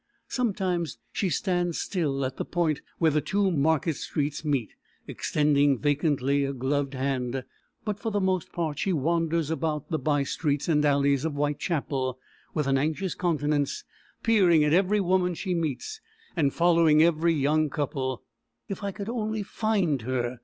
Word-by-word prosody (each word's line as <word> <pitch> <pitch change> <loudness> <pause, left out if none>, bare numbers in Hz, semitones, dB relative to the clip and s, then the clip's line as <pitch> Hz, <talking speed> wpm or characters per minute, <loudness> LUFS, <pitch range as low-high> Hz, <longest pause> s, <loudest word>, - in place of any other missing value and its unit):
Sometimes 190 -8 -1
she 195 - -1
stands 175 +2 0
still 145 -8 -1
at 130 0 -4
the - - -2
point 165 -4 0 0.2
where 160 -2 +3
the 150 +1 +1
two 195 +6 +1
market 160 0 +1
streets 145 +1 -3
meet, 140 -7 -1 0.3
extending 145 -2 +2
vacantly 145 -1 +1
a 140 0 -2
gloved 140 +2 -1
hand, 130 -1 -2 0.4
but 210 -2 -2
for 225 - -2
the 205 - +1
most 185 -3 0
part 160 -4 -2
she 195 - 0
wanders 165 +1 0
about 155 -2 -2
the 160 - 0
by 145 -2 +1
streets 145 0 -1
and 150 -3 +3
alleys 140 -1 +3
of 160 -2 -1
Whitechapel 145 -3 -1 0.4
with 150 - +1
an 135 0 +2
anxious 160 +6 -1
countenance, 150 -4 0 0.4
peering 185 -9 +5
at 150 0 +2
every 195 +4 +3
woman 180 -1 +1
she 185 +2 -2
meets, 165 - -3 0.3
and 145 -5 +2
following 165 -2 +4
every 165 0 +3
young 150 +2 +2
couple. 135 -4 -3 0.4
"If 200 -1 -6
I 200 - -1
could 200 +1 -7
only 220 -2 -2
find 195 - 0
her!" 125 0 -2
155 Hz, 160 wpm, -27 LUFS, 140-175 Hz, 0.4 s, peering